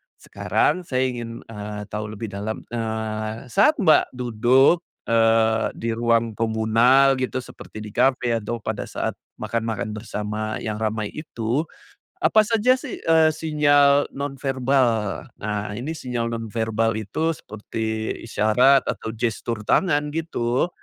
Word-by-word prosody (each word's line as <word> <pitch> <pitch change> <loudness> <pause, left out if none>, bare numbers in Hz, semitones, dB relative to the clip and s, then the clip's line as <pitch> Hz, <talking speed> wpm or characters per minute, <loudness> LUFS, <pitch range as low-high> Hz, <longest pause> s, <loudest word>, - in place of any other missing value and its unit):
sekarang 180 -2 -1
saya 130 -1 +1
ingin, 115 -1 -7
eee, 105 -1 -6
tahu 105 0 -4
lebih 110 0 -6
dalam, 105 +3 -5
eee, 110 +1 -4
saat 215 +10 +4
Mbak 155 -8 +4
duduk, 125 +6 +3 0.3
eee, 115 -1 +3
di 115 - -3
ruang 115 0 +1
komunal, 115 +5 +4
gitu. 130 0 -2
Seperti 110 -3 -10
di 105 - -8
kafe 125 0 +2
atau 115 +1 -5
pada 110 -2 -3
saat - - -2 0.3
makan-makan 115 0 -2
bersama, 105 0 -4
yang 110 -1 -3
ramai 110 -1 -2
itu. 140 0 -3 0.5
Apa 215 - +5
saja 230 +3 +3
sih, 285 - -6
eee, 160 -1 +5
sinyal 145 -2 +3
nonverbal. 135 -5 0
Nah, 105 0 -3
ini 140 +7 -4
sinyal 120 -6 -3
nonverbal 115 0 -1
itu, 110 +10 -1
seperti 110 +1 -4
isyarat 125 +5 +4
atau 110 - -3
gestur 115 -1 -2
tangan, 150 -5 +2
gitu. 135 -4 0
115 Hz, 125 wpm, -23 LUFS, 110-135 Hz, 0.5 s, Apa